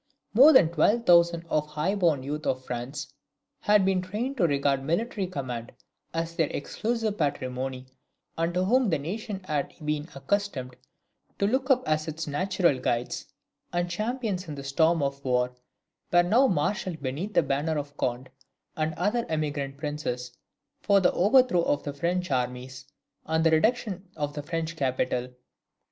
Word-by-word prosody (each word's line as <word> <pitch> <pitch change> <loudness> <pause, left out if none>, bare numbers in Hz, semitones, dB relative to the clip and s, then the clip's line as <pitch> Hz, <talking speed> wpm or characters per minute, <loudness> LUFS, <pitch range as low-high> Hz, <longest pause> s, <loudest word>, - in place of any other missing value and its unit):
More 270 +8 +9
than 260 - +6
twelve 225 +7 +2
thousand 170 -1 +5
of 150 -2 +1
the 150 - -19
high 155 +6 0
born 170 -9 +2
youth 150 +3 -4
of 130 0 -1
France, 130 +3 -5 0.5
who - - -1
had 210 -2 +6
been 190 -1 +2
trained 215 +9 -3
to 180 -7 +4
regard 140 -2 +1
military 195 - -1
command 125 -8 -5 0.4
as 165 0 -3
their 160 -3 +2
exclusive 220 +5 -2
patrimony, 130 -3 -2 0.5
and 165 +1 0
to 180 +1 +2
whom 250 +2 +3
the 160 - +2
nation 195 +6 -5
had 150 -5 -2
been 150 0 -1
accustomed 135 -4 -2 0.6
to 200 - +1
look 260 +6 0
up 255 -1 +3
as 155 +1 +1
its 160 +1 -4
natural 170 -1 +1
guides 120 -1 -2 0.4
and 175 0 -1
champions 215 -2 -2
in 150 - -5
the 140 - -7
storm 160 +3 +2
of 140 0 -3
war; 125 -1 +1 0.6
were 175 0 +6
now 235 +10 +4
marshalled 175 - -1
beneath 155 +11 -3
the 170 - +5
banner 145 +3 0
of 145 0 -5
Conde 130 0 -2 0.4
and 155 0 -1
the - - -12
other 235 +3 +1
emigrant 145 -3 -2
princes, 135 -5 -4 0.5
for 200 -1 +4
the 185 - +3
overthrow 215 -1 +4
of 145 - 0
the 145 - -4
French 175 +4 -1
armies, 130 +1 -3 0.4
and 160 0 +1
the 165 - +4
reduction 195 +1 +1
of 145 -1 -2
the 150 - -4
French 165 +2 -3
capital. 130 -3 -1
160 Hz, 165 wpm, -27 LUFS, 140-190 Hz, 0.6 s, More